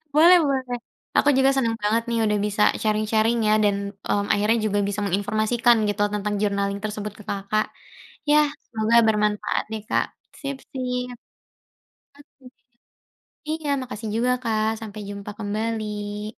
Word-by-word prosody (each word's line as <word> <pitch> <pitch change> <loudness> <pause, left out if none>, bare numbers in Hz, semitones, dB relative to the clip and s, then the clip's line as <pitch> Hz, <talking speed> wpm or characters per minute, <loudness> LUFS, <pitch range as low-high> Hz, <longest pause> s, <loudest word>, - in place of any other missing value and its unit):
boleh 345 +4 +8
boleh, 260 -2 -1 0.4
aku 290 - +5
juga 270 0 +5
seneng 230 -4 +1
banget 220 +3 +1
nih 230 - 0
udah 210 -1 +2
bisa 210 0 -1 0.2
sharing-sharing 215 +2 +2
ya 215 - +4
dan, 205 -1 +3 0.3
mmm, 200 0 +1
akhirnya 210 +3 +2
juga 205 -1 +1
bisa 205 +1 -2
menginformasikan 215 +5 +2
gitu 205 0 -2
tentang 210 0 -1
journaling 200 -1 0
tersebut 210 0 -4
ke - - -10
Kakak. 200 +2 0 0.6
Ya, 300 - +6 0.3
semoga 225 +1 +2
bermanfaat 210 -1 +1
deh 220 -1 -4
Kak. - - +2 0.4
Sip-sip, 250 -3 -4 1.1
oke - - -15 0.2
deh, 250 -1 -14 1.0
iya 315 -1 -3
makasih 225 -3 -6
juga 240 +3 +1
Kak, 220 -2 +1
sampai 215 -1 -7
jumpa 200 0 -6
kembali. 210 -1 -3
215 Hz, 140 wpm, -24 LUFS, 210-240 Hz, 1.1 s, boleh